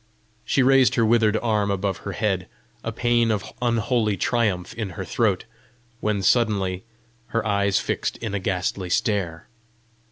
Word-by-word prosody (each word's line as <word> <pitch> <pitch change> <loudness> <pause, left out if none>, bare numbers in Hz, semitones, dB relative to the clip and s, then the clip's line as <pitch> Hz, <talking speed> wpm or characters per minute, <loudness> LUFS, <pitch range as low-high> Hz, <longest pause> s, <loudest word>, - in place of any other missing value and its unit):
She 135 - +2
raised 135 0 +5
her 115 - +3
withered 110 -1 +3
arm 105 -3 +1
above 100 -1 -1
her 100 - -6
head, 95 -2 -1 0.4
a 115 - -2
pæan 120 0 +2
of 105 -3 -2
unholy 115 -3 +1
triumph 105 -3 0
in 110 -3 -4
her 95 - -4
throat 105 -5 0 0.5
when 105 -3 -1
suddenly 95 -4 +2 0.4
her 115 -1 -1
eyes 100 -1 +2
fixed - - -2
in 115 -4 -5
a 100 - 0
ghastly 90 0 -2
stare. 100 -6 -1
105 Hz, 150 wpm, -24 LUFS, 95-115 Hz, 0.5 s, raised